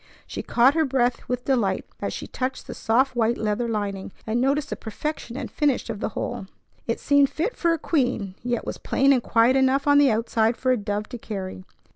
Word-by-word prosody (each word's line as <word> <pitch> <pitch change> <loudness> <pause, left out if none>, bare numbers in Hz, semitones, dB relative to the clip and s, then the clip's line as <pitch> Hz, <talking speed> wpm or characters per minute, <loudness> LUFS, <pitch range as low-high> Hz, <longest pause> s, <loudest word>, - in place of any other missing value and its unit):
She - - -5
caught 245 +3 +4
her 320 0 +2
breath 250 -4 0
with 250 0 -2
delight 235 -8 +1 0.2
as - - -2
she - - -5
touched 255 +1 -4
the - - -7
soft 255 +4 +1
white 235 0 +2
leather 220 +2 -1
lining, 200 -3 -3
and 225 +2 0
noticed 280 +2 +1
the - - -1
perfection 245 +2 -5
and 265 -4 -5
finish 285 -6 0
of 215 - -6
the - - -2
whole. 190 - -3 0.4
It 230 - -1
seemed 285 -1 +4
fit 360 +10 -2
for 340 - +1
a 330 - +1
queen, 250 - 0
yet 240 -1 -2
was - - -5
plain 275 +1 +3
and 255 - +2
quiet 230 +3 +3
enough 265 +1 +3
on 285 0 +6
the 285 -2 +5
outside 225 0 +1
for 255 - +1
a - - +4
dove 205 0 -3
to 245 - -7
carry. 190 -4 -6
245 Hz, 215 wpm, -24 LUFS, 220-275 Hz, 0.4 s, on